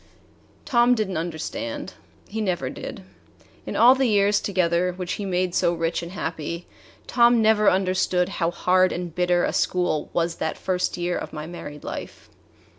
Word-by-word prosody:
Tom 240 -1 +4
did 215 -4 -1
n't 185 - -2
understand. 285 - -5 0.3
He 220 +1 -4
never 185 -4 -1
did. - - -8 0.6
In - - -4
all 245 +2 +7
the 265 -1 +1
years 205 -1 +3
together, 180 -2 +1
which 180 0 -5
he 205 - -4
made 180 -1 0
so 170 - +2
rich 165 0 -1
and 170 +1 -8
happy, 170 -1 -4 0.4
Tom 240 -1 +4
never 215 -1 +4
understood 185 -1 +1
how 170 -3 -1
hard 185 +1 +2
and 175 -2 -4
bitter 180 0 +2
a - - 0
school 180 -4 0
was 170 0 -1
that 160 - -2
first 180 -1 -1
year 175 0 -1
of - - -7
my 150 -1 -5
married 155 -3 -9
life. - - -8
180 Hz, 170 wpm, -24 LUFS, 170-210 Hz, 0.6 s, all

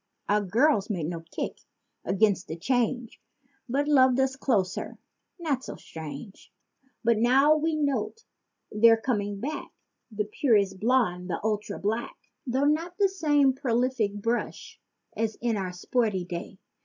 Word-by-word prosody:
Our 210 +1 +3
girls 215 - +2
made 180 -7 -2
no 170 +1 -3
kick 165 - -5 0.6
'gainst 200 -2 +2
the 160 - -5
change, 245 +3 -1 0.5
but 280 +4 0
loved 260 -3 +5
us, 265 0 +1
closer—not 265 - -3
so - - -7
strange. 160 +4 -9 0.5
But 230 -1 +3
now 270 +6 +5
we 315 +1 0
note 285 - -1 0.5
they're 225 +2 +6
coming 205 -4 -2
back—the 220 -4 -6
purest 205 -4 +1
blonde 210 -6 +1
and 165 - -2
ultra 210 -1 -2
black— 220 +4 -2 0.3
Though 260 +3 +1
not 330 +4 0
the 400 -2 +4
same 295 -7 +3
prolific 245 -5 0
brush 230 +4 -3 0.4
as 220 -1 -1
in 235 -2 -1
our 190 -3 -3
sporty 195 0 -1
day. 175 +1 -6
230 Hz, 130 wpm, -27 LUFS, 200-265 Hz, 0.6 s, they're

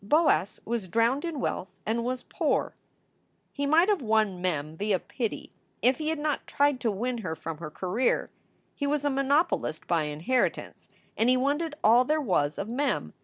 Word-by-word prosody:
Boas 210 - +2
was 230 -4 -2
drowned 230 - +2
in 335 -4 -3
wealth 185 - -2 0.2
and 230 +2 0
was 250 +1 -3
poor. - - -1 0.8
He 285 0 -2
might 325 +5 +5
have 410 -6 +2
won 215 -5 +1
Mem 155 -4 -2
via 205 +2 +1
pity, 230 +4 -5 0.3
if 255 +3 +3
he 310 0 -1
had 320 - -1
not 295 -1 -2
tried 285 -2 +2
to 245 -3 0
win 235 +4 -2
her 170 -7 -4
from 160 -1 -6
her 160 -2 -6
career. 190 +10 0 0.4
He 285 - -2
was 290 0 0
a 290 - +2
monopolist 275 +4 +1
by 165 -3 +1
inheritance, 155 +13 -1 0.3
and 230 - +2
he 255 - +4
wanted 295 +4 0
all 235 +3 +6
there 305 +4 +1
was 150 - 0
of 200 - -3
Mem. 270 +5 -1
240 Hz, 180 wpm, -28 LUFS, 190-285 Hz, 0.8 s, all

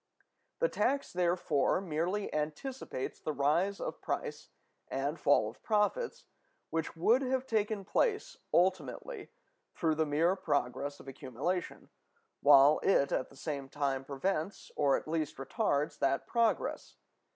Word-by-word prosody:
The - - +3
tax, 280 - 0
therefore, 175 -5 +2
merely 180 +3 -2
anticipates 150 - -4
the 155 - -3
rise 165 +8 +1
of - - -5
price - - -4 0.4
and 140 +4 -2
fall 140 -6 +4
of 110 - -10
profits 215 - 0 0.5
which 165 0 -2
would 230 +10 +4
have 260 0 0
taken 215 -4 -1
place 470 - 0 0.2
ultimately 175 -8 0 0.5
through 160 -1 +1
the 155 0 0
mere 165 +6 +2
progress 145 -5 -1
of - - -14
accumulation, 135 +7 -4 0.5
while 145 +1 +7
it 140 -8 +3
at - - -1
the - - -17
same 140 -2 -4
time 135 -2 -1
prevents, 155 +6 -3
or 140 -2 +3
at - - -8
least 155 -1 -2
retards, 145 - -1
that 135 0 +1
progress. 230 -1 0
160 Hz, 130 wpm, -32 LUFS, 140-200 Hz, 0.5 s, while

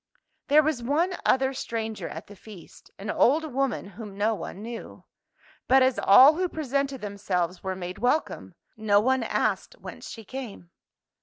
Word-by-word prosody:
There 300 +2 +5
was 295 -5 -1
one 320 +9 0
other 265 +1 +3
stranger 225 -3 -4
at - - -8
the 205 - -13
feast: 200 -2 -14
an 205 +2 -4
old 305 +2 +2
woman 270 -4 -1
whom 205 -2 -10
no 215 +2 +1
one 200 +1 -7
knew. 230 0 -8 0.6
But 265 +1 +6
as 260 0 +2
all 260 +9 +8
who 365 0 0
presented 275 -3 -2
themselves 185 -4 -2
were 190 -1 -3
made 180 0 -7
welcome, 250 +7 -1 0.2
no 210 -2 +3
one 260 +4 +2
asked - - -1
whence - - -9
she 225 -2 -9
came. 225 -10 -8
235 Hz, 160 wpm, -26 LUFS, 205-270 Hz, 0.6 s, all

